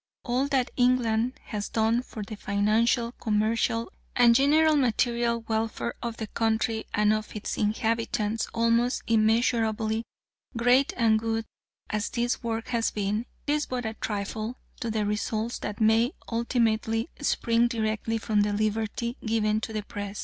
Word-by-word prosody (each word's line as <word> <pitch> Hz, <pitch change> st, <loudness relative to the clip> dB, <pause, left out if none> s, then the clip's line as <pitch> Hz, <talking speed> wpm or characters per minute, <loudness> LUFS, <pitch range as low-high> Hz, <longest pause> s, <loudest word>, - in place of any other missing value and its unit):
All 255 Hz, +3 st, 0 dB
that 270 Hz, -3 st, +1 dB
England 245 Hz, -1 st, +2 dB
has 210 Hz, -1 st, -4 dB
done 225 Hz, +2 st, +2 dB
for 220 Hz, -4 st, -7 dB
the 215 Hz, +2 st, -7 dB
financial, 215 Hz, +4 st, +1 dB
commercial, 230 Hz, 0 st, 0 dB, 0.2 s
and 240 Hz, -1 st, +6 dB
general 305 Hz, +5 st, +4 dB
material 235 Hz, -2 st, +1 dB
welfare 225 Hz, +1 st, -2 dB
of 235 Hz, -1 st, -4 dB
the 220 Hz, -, -3 dB
country 225 Hz, 0 st, 0 dB
and 210 Hz, 0 st, +3 dB
of 215 Hz, 0 st, -4 dB
its 210 Hz, -, -3 dB
inhabitants, 225 Hz, 0 st, 0 dB
almost 230 Hz, +2 st, +1 dB
immeasurably 225 Hz, 0 st, +2 dB, 0.5 s
great 245 Hz, +4 st, +4 dB
and 225 Hz, -2 st, +4 dB
good 225 Hz, 0 st, -2 dB, 0.5 s
as 210 Hz, -1 st, -1 dB
this 240 Hz, 0 st, -1 dB
work 230 Hz, -1 st, -3 dB
has 235 Hz, -2 st, +1 dB
been, 210 Hz, +3 st, -2 dB, 0.2 s
is 295 Hz, +1 st, 0 dB
but 250 Hz, -2 st, -3 dB
a 220 Hz, -, -2 dB
trifle 215 Hz, +3 st, -4 dB, 0.2 s
to 235 Hz, -, -3 dB
the 215 Hz, -1 st, 0 dB
results 215 Hz, +2 st, -2 dB
that 205 Hz, -, -5 dB
may 225 Hz, +5 st, +3 dB, 0.2 s
ultimately 230 Hz, -1 st, +1 dB
spring 235 Hz, -4 st, +2 dB
directly 225 Hz, -1 st, -1 dB
from 215 Hz, -1 st, +1 dB
the 205 Hz, 0 st, +1 dB
liberty 220 Hz, +3 st, -1 dB
given 215 Hz, -1 st, +1 dB
to 225 Hz, -, -4 dB
the 215 Hz, -1 st, -3 dB
Press. 205 Hz, 0 st, -6 dB
225 Hz, 145 wpm, -27 LUFS, 215-235 Hz, 0.5 s, and